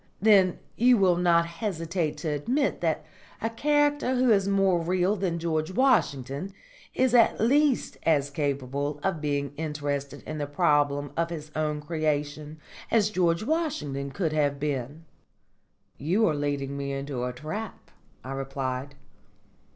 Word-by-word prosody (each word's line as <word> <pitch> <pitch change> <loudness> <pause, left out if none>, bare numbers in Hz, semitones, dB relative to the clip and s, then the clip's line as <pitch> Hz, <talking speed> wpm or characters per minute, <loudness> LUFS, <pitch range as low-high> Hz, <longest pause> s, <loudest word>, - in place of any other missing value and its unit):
"Then 195 -3 +5 0.2
you 245 +1 +5
will 185 -3 +4
not 170 -1 +4
hesitate 170 -2 -3
to 160 - -3
admit 240 - 0
that - - 0 0.3
a 225 - -2
character 290 +1 +2
who 250 -1 +3
is 200 -2 +3
more 195 -3 +3
real 180 +4 +1
than 180 -4 -1
George 160 -2 -1
Washington 185 - +1 0.4
is 255 -1 +2
at 235 -2 +5
least 275 +4 +2
as 145 -3 +2
capable 140 0 -2
of 180 -5 -1
being 145 -2 -1
interested 145 -2 -3
in 155 - -6
the 145 - -2
problem 145 -2 +1
of 165 0 0
his 155 -3 -7
own 150 -1 -1
creation 150 -1 -2 0.3
as 215 -2 +3
George 175 -2 +1
Washington 225 - -2
could 160 +2 -2
have 145 -2 +1
been." 145 +2 -3 0.9
"You 190 +10 +2
are 155 - +2
leading 145 -1 -2
me 140 0 -3
into 135 -2 -4
a 125 - -1
trap," 155 - -7 0.3
I 130 - -7
replied. 135 0 -4
155 Hz, 145 wpm, -27 LUFS, 145-195 Hz, 0.9 s, Then